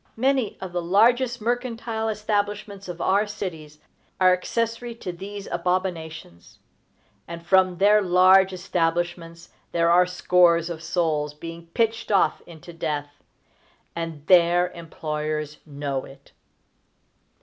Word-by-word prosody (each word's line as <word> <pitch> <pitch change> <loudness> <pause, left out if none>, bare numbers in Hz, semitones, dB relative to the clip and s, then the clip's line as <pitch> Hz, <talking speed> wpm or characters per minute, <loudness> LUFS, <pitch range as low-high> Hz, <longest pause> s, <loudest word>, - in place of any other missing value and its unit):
Many 260 -2 +1
of 190 -2 -7
the 175 0 -2
largest 235 +7 +3
mercantile 230 -1 -2
establishments 205 -2 -2
of 175 -1 -7
our 200 +3 +2
cities 165 -7 -7 0.4
are 185 -1 +6
accessory 230 +5 -2
to 190 -5 -6
these 200 +3 -8
abominations; 170 - -3 0.7
and 170 0 -8
from 185 0 +3
their 210 +2 +5
large 190 +1 +5
establishments 170 -2 -2 0.2
there 170 0 +3
are 180 +1 +5
scores 175 -1 +3
of 165 -1 -6
souls 160 -3 -1
being 165 +2 -9
pitched 225 0 0
off 195 - +2
into 170 0 -12
death; 145 -3 -4 0.7
_and 165 -3 -5
their 175 0 +4
employers 155 -2 -5
know 140 -2 -4
it! 135 - -16
180 Hz, 115 wpm, -24 LUFS, 165-205 Hz, 0.7 s, are